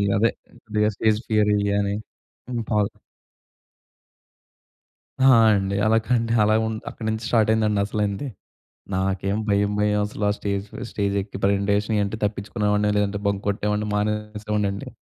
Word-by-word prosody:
అదే 110 +3 +3 0.4
కొద్దిగా 105 0 +1
stage 110 +1 +2
fear 105 -1 +3
ఇయా 100 0 +1
అని. 100 0 -1 0.6
ఇన్ 120 -2 -2
ఫాల్ 105 -1 +2 2.3
ఆ! - - +5 0.3
అండి. 100 0 -1
అలా 110 +1 +4
కండి 115 -2 +1
అలా 105 +1 +3
ఉన్ 110 - -3
అక్కడి 110 - -8
నుంచి 110 +1 -2
స్టార్ట్ 110 -3 +3
అయిందండి 110 -2 +2
అసలైంది. 105 +4 -2 0.7
నాకేం 95 +1 0
భయం, 100 0 +2
భయం 105 0 +2
అసలు 105 0 -5
ఆ - - +3
స్టేజ్ 100 -1 -2
ఫ - - -13 0.2
స్టేజ్ 100 -1 -1
ఎక్కి 100 0 -7
ప్రెజెంటేషన్ 100 +2 +1
ఇయి 105 - +2
అంటే 100 +2 -3
తప్పించుకునేవాడిని, 105 0 0
లేదంటే 100 0 0
బంక్ 100 -1 0
కొట్టేవాడిని, 105 +1 -1
మానేసేవాడినండి. 105 -1 -2
105 Hz, 145 wpm, -23 LUFS, 100-105 Hz, 2.3 s, ఆ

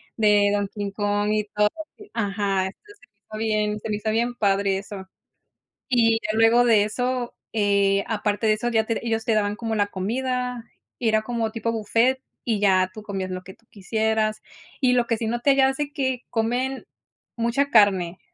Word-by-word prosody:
de 205 -2 +4
don 205 -1 0
King 205 -1 -5
Kong 205 0 0
y 215 -1 0
todo 210 0 +4 0.3
así 415 -1 -15
ajá. 200 -3 0
Entonces 410 - -14
me 280 - -22 0.2
fue 215 0 -7
bien, 210 -1 0
se 220 - -7
me 210 - 0
hizo 215 +1 -2
bien 235 +2 0
padre 195 -2 +1
eso. 195 -1 -8 0.8
Y 230 -3 +3
ya 215 - -2
luego 225 +2 +5
de 225 -4 +5
eso, 245 +2 -2 0.2
eh, 200 -2 +2
aparte 210 0 -1
de 215 - +5
eso, 240 +3 -2
ya 220 -1 +2
te 230 +1 -3
ellos 225 -1 -1
te 225 - +1
daban 205 -1 +1
como 225 0 -3
la 205 - +2
comida, 250 +4 -2 0.3
era 220 -2 +2
como 225 -1 -2
tipo 230 0 -2
buffet, 230 +4 +1 0.3
y 220 -3 +1
ya 185 -2 +3
tú 215 - -9
comías 195 -3 -4
lo 185 0 -5
que 190 +1 -12
tú - - -32
quisieras. 215 +1 -1 0.4
Y 250 -2 +3
lo 240 -1 +2
que 230 - 0
sí 225 - -3
noté 240 +4 +2
ya 265 -1 +4
hace, 285 +2 -3
que 260 -4 -2
comen 245 +4 -1 0.5
mucha 240 +5 0
carne, 190 -5 +4
220 Hz, 190 wpm, -24 LUFS, 205-240 Hz, 0.8 s, luego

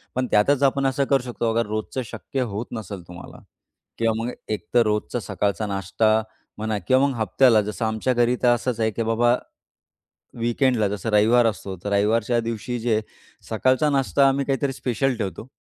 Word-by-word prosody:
पण 130 0 0
त्यातच 130 +7 +3
आपण 140 0 +2
असं 135 +1 0
करू 135 -2 +2
शकतो. 120 -2 -2
अगर 115 +1 +1
रोजचं 110 +4 -3
शक्य 135 +4 -5
होत 110 +4 -3
नसेल 105 -4 -6
तुम्हाला, 90 0 -11 0.6
किंवा 115 -1 +1
मग 125 - -2 0.2
एक 110 - -3
तर 120 - +6
रोजचा 105 +3 -1
सकाळचा 105 -1 -2
नाश्ता 100 +3 +1 0.4
म्हणा 110 0 -2
किंवा 130 +8 +3
मग 140 - -2
हप्त्याला 110 +2 +4
जसं 105 +2 -3
आमच्या 110 +3 0
घरी 120 0 +2
तर - - +4
असंच 120 -1 -3
आहे, 110 0 +1
की 115 +3 -2
बाबा 120 +2 +2 1.0
वीकेंडला, 120 -1 +1
जसं 100 +2 -4
रविवार 110 +3 +4
असतो, 95 -2 -4
तर 105 - -3
रविवारच्या 110 +3 +2
दिवशी 115 +2 -4
जे 115 -1 0
आहे 110 - +1 0.5
सकाळचा 130 +6 +2
नाश्ता 140 0 +3
आम्ही 140 +1 0
काहीतरी 135 0 -1
स्पेशल 130 0 -1
ठेवतो 100 +1 -5
115 Hz, 175 wpm, -23 LUFS, 105-130 Hz, 1.0 s, तर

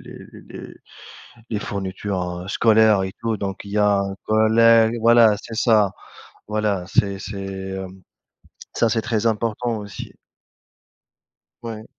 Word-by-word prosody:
les - - -13
les - - -10 0.7
les 110 - -2
fournitures, 95 -3 -4
heu, 95 - -10
scolaires 110 -3 +4
et 95 0 -4
tout 115 -2 -1
donc 95 -1 -5
il 100 - -10
y 105 - -1
a 105 -1 +3
un 100 0 -3
collègue 110 +1 +4
voilà 115 -2 +5
c'est 115 - -9
ça. 110 -4 +3 0.6
Voilà 105 -3 -1
c'est 100 -1 0
c'est 100 0 -6 0.3
hem, 95 0 -9 0.7
ça 115 - +1
c'est 115 - +1
très 115 -1 -2
important 115 +1 -1
aussi. 100 -1 -9 1.5
Ouais. 110 -2 -7
105 Hz, 135 wpm, -21 LUFS, 100-115 Hz, 1.5 s, voilà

